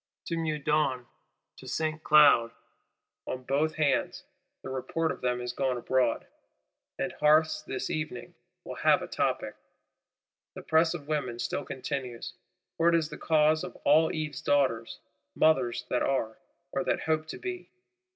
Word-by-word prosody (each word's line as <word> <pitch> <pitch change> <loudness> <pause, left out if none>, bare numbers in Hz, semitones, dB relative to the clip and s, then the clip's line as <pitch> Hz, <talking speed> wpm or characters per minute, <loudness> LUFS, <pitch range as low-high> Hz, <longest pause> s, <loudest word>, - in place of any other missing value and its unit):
To 170 - -1
Meudon, 150 -5 0 0.5
to - - -12
Saint 155 0 -2
Cloud, 145 -6 +6 0.8
on 130 - -4
both 145 +5 0
hands, 155 -2 0 0.4
the 130 - -6
report 160 +5 -1
of - - -7
them 125 -1 0
is 125 0 -4
gone 130 -1 -1
abroad; 125 -1 0 0.7
and - - -2
hearths, 155 0 +4
this - - -4
evening, 155 -5 -4 0.3
will - - -8
have - - +3
a - - -6
topic. - - -1 1.0
The - - -8
press 165 +2 +3
of 145 -4 -8
women 145 -6 -2
still 120 0 -3
continues, 130 -2 -5 0.4
for 165 +1 +4
it 170 - +3
is 160 -2 +1
the 150 - -8
cause 155 0 +3
of 180 - -7
all 155 +3 +5
Eve's 150 -4 -4
Daughters, 130 -6 +1 0.4
mothers 130 -7 +2
that 125 - +1
are, 115 -5 0 0.4
or 180 - -1
that - - 0
hope 155 0 0
to - - -6
be. 365 -1 -6
150 Hz, 150 wpm, -29 LUFS, 130-155 Hz, 1.0 s, Cloud